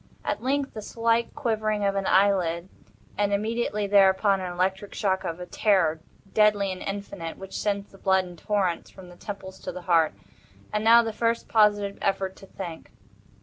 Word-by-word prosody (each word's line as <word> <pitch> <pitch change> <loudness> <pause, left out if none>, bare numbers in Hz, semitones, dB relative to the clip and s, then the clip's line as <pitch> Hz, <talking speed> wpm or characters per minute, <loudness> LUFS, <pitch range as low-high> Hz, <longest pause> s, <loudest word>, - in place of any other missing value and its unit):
At - - -2
length 275 +2 -1
the 215 - -6
slight 230 +2 0
quivering 215 -5 -1
of 200 - +2
an 195 -1 -1
eyelid, 185 -3 +2 0.5
and 205 -1 +2
immediately 210 0 -1
thereupon, 195 0 +4
an 180 -1 -4
electric 190 +3 -2
shock 190 -3 0
of 165 +1 -4
a 180 - -6
terror, 185 -5 +2 0.3
deadly 210 -2 +3
and 185 - -6
indefinite, 195 -4 -5
which 190 0 -10
sends 200 -1 -2
the 195 - -16
blood 190 -1 +2
in 180 -1 -10
torrents 185 -1 -1
from 185 -2 -13
the 175 - -13
temples 190 0 -8
to - - -5
the 180 - -8
heart. 165 -3 +3 0.6
And 210 0 0
now 230 +1 +7
the 225 -1 -3
first 230 +1 0
positive 205 -2 +2
effort 190 -1 -1
to 195 - -14
think. 175 -5 -8
200 Hz, 180 wpm, -26 LUFS, 185-210 Hz, 0.6 s, now